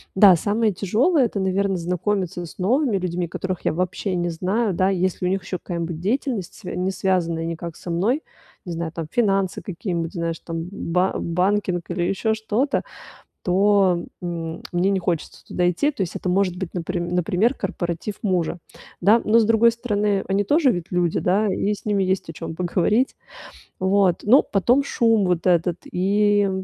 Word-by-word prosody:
Да, 190 -3 +8
самое 215 +4 +1
тяжёлое- 240 - +2
это, 205 -3 -2
наверно, 190 +1 +1
знакомиться 180 +1 -2
с - - -12
новыми 235 +5 +1
людьми, 180 -1 -2
которых 185 +2 -4
я - - +2
вообще 185 +2 -2
не 175 0 -1
знаю, 190 +5 0
да, 185 +2 +2
если 185 -1 0
у - - +2
них 190 0 -1
ещё 185 - -4
какая-нибудь 170 -2 -4
деятельность, 225 - -2
свя 180 -5 -7
не 185 +1 0
связанная 180 -3 0
никак 165 0 -5
со 175 - -9
мной, 220 - +1 0.4
не 175 - -7
знаю, 165 -1 -4
там, 165 -2 -4
финансы 195 -5 +1
какие-нибудь, 170 -2 -4
знаешь, 170 -2 -3
там, 165 +1 -5
ба 180 0 0
банкинг 180 0 0
или 175 0 -1
ещё 195 +5 0
что-то, 220 +6 0 0.6
то, 190 -1 +3 0.2
м 165 -2 -4
мне 175 +3 +2
не 195 -1 +1
хочется 170 -2 -3
туда 180 0 +1
идти. 285 - +1
То 245 - -6
есть 175 - -5
это - - -5
может 185 -1 +1
быть, 185 -2 -5
наприм 175 0 -3
например, 180 +7 +1
корпоратив 190 -2 -4
мужа, 180 -4 0 0.4
да, 215 +6 +5
но, 225 +2 +4
с 220 - +3
другой 230 +1 +5
стороны, 210 -4 0
они 200 +1 +1
тоже 290 - +3
ведь 175 -2 -5
люди, 175 -2 +1
да, 200 +4 +2
и 205 - 0
с 205 - -10
ними 205 -2 +1
есть 185 -2 -1
о 165 - -5
чём 165 0 -6
поговорить. 180 +8 +1 0.6
Вот, 190 -2 +2
но 250 +7 +6
потом 245 +8 +2
шум 225 -6 +2
вот 180 -1 0
этот 175 0 +2
и, 205 +2 +2
185 Hz, 180 wpm, -22 LUFS, 175-210 Hz, 0.6 s, Да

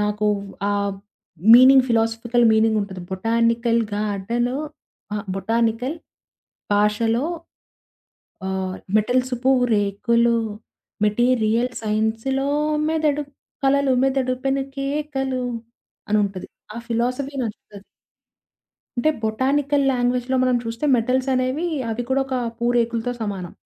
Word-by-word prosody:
నాకు 210 0 0 0.4
ఆ - - +1 0.8
meaning, 255 +1 +8
philosophical 230 +1 +1
meaning 220 0 +3
ఉంటది. 190 -2 -7
బొటానికల్‌ 230 +3 +1
గాడ్డలో 215 +4 -1 0.6
అహా! 210 -1 -2
బొటానికల్ 230 - 0 0.8
భాషలో 225 +5 +2 1.2
ఆహ్, 190 -1 -3 0.2
మెటల్సు 250 +3 0
పూరేకులు. 235 -2 +2 0.7
మెటీరియల్ 235 +1 +2
సైన్స్‌లో 220 +6 -1 0.4
మెదడు 305 -2 +1 0.4
కలలు 275 0 +3
మెదడు 265 -1 +1
పెనుకేకలు' 270 -1 -2 0.6
అనుంటది. 200 -3 0 0.3
ఆ - - -8
ఫిలాసఫీ 250 +4 -1
నచ్చుతది. 205 -3 -8 1.1
అంటే 275 +6 +2
బొటానికల్ 275 +5 +1
లాంగ్వేజ్‌లో 250 +1 0
మనం 255 -1 +2
చూస్తే 230 +5 -4
మెటల్సనేవి 255 +5 0 0.2
అవి 225 +2 -2
కూడోక 265 0 0 0.3
పూరేకులతో 235 0 0
సమానం. 195 -5 -4
240 Hz, 85 wpm, -22 LUFS, 220-265 Hz, 1.2 s, meaning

